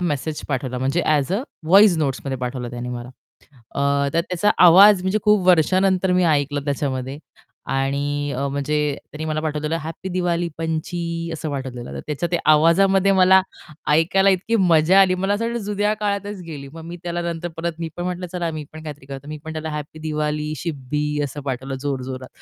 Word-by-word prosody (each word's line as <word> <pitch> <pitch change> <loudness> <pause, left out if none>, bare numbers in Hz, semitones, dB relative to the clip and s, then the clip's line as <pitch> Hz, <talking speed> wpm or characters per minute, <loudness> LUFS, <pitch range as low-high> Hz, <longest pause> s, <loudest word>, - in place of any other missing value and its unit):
Message 155 -2 -2
पाठवला 130 -2 -2
म्हणजे 135 +7 0
as 140 +5 -1
a, 205 - +1 0.3
voice 195 +1 +6
नोट्समध्ये 135 -2 -2
पाठवलं 125 -1 -4
त्याने 120 +1 -5
मला. 120 0 -6 0.6
अ, 140 0 +1
तर 165 - +4
त्याचा 180 +3 0 0.2
आवाज 190 +3 +8
म्हणजे 190 +3 +1
खूप 210 -3 +3
वर्षानंतर 185 +2 +3
मी 180 0 +3
ऐकलं 145 0 -1
त्याच्यामध्ये 135 -1 -2 0.6
आणि 145 +1 -1
अ, 140 +2 -1
म्हणजे 140 +2 -1 0.3
त्यांनी 155 +1 -5
मला 155 0 -1
पाठवलेलं 155 +1 -2
"हॅप्पी 160 +4 -6
दिवाळी 175 -1 0
पंची" 165 +1 -3
असं 160 -1 -4
पाठवलेलं 130 -3 -5
तर - - -5
त्याच्या 155 +3 -2
ते 175 - +2
आवाजामध्ये 190 +5 +4
मला 190 0 +6 0.5
ऐकायला 190 +5 +4
इतकी 195 +5 +1
मजा 180 -1 +5
आली 185 -1 +4
मला 195 +2 0
असं 225 +3 -2
वाटलं 235 0 -2
जुन्या 210 +1 0
काळातच 205 -1 -2
गेली, 145 -4 -8
मग 165 0 -9
मी 170 +1 -7
त्याला 175 0 -3
नंतर 170 0 -3
परत 170 +1 -2
मी 165 -1 -3
पण 175 - -4
म्हटलं, 180 0 -3
चला 175 -2 -2
मी 155 -1 -6
पण 155 0 -10
काहीतरी 150 -3 -9
करतो. 135 +1 -8
मी 155 0 -6
पण 160 - -6
त्याला 160 0 -4
"हॅपी 150 +1 -6
दिवाळी 150 -1 -2
शिब्बी" 150 -1 -3
असं 145 +1 -6
पाठवलं 135 0 -4
जोरजोरात. 130 -2 -4
160 Hz, 180 wpm, -21 LUFS, 140-180 Hz, 0.6 s, आवाज